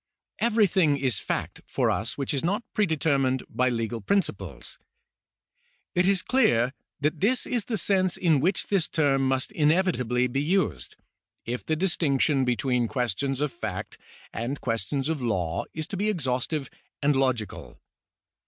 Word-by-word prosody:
Everything 195 -10 +3
is 130 -7 0
fact - - -3
for - - +1
us 115 +3 -2
which 140 0 -2
is 140 - -1
not 200 +7 0
predetermined 140 -9 +1
by 125 +3 +1
legal 115 -1 -2
principles. 195 - -2 1.1
It 180 -1 +3
is 195 -2 +3
clear 130 - +3 0.3
that 150 +2 0
this 235 +7 +2
is 235 -5 -1
the 225 - -1
sense 185 -3 +2
in 165 -5 +3
which 180 +7 +1
this 195 -5 +1
term 140 -4 +2
must 130 +7 0
inevitably 150 - +2
be 125 +3 -1
used, 145 - 0 0.5
if 120 +2 -3
the 155 - 0
distinction 150 -5 +1
between 125 -1 +1
questions 125 +3 -1
of 150 -2 0
fact 110 -5 -6 0.3
and 125 +5 -3
questions 125 +4 -2
of 160 -3 -1
law 90 -8 -1
is 155 0 -4
to 195 - -4
be 210 +3 +1
exhaustive 135 - -1 0.3
and 145 0 +3
logical. 130 -5 -1
140 Hz, 145 wpm, -26 LUFS, 125-180 Hz, 1.1 s, Everything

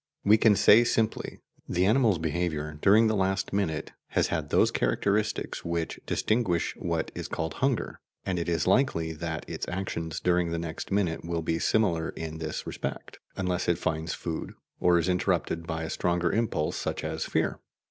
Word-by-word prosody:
We 105 +2 +6
can 110 -1 +5
say 110 +4 +7
simply: 115 -2 -1 0.3
The 90 +1 +2
animal's 110 -2 +4
behaviour 80 -2 -2
during 105 +3 +6
the 110 -1 +2
last 95 0 0
minute 90 -6 -1 0.2
has - - +1
had - - -2
those - - +4
characteristics 100 - 0
which 85 -1 -2
distinguish 110 -7 0
what - - -2
is - - -5
called 80 0 -3
"hunger," 135 -2 0 0.3
and 90 -2 -1
it 85 - -2
is 85 -3 +1
likely 90 -7 +2
that 80 0 -5
its - - -4
actions 85 -3 -3
during 90 -1 +2
the 85 - -2
next 85 +1 -5
minute 95 -5 0
will 85 -1 -2
be 80 +1 0
similar 85 -7 +1
in 80 -1 -6
this 80 -1 -4
respect, - - -6 0.2
unless 90 -2 -1
it 85 - +2
finds 80 -2 -2
food, 80 -2 -5 0.2
or 90 -1 +4
is 85 +1 +1
interrupted 90 -2 0
by 80 -1 -3
a 80 - -4
stronger 85 -1 +1
impulse, 110 -9 0
such - - -3
as - - -2
fear. - - 0
85 Hz, 175 wpm, -28 LUFS, 80-100 Hz, 0.3 s, say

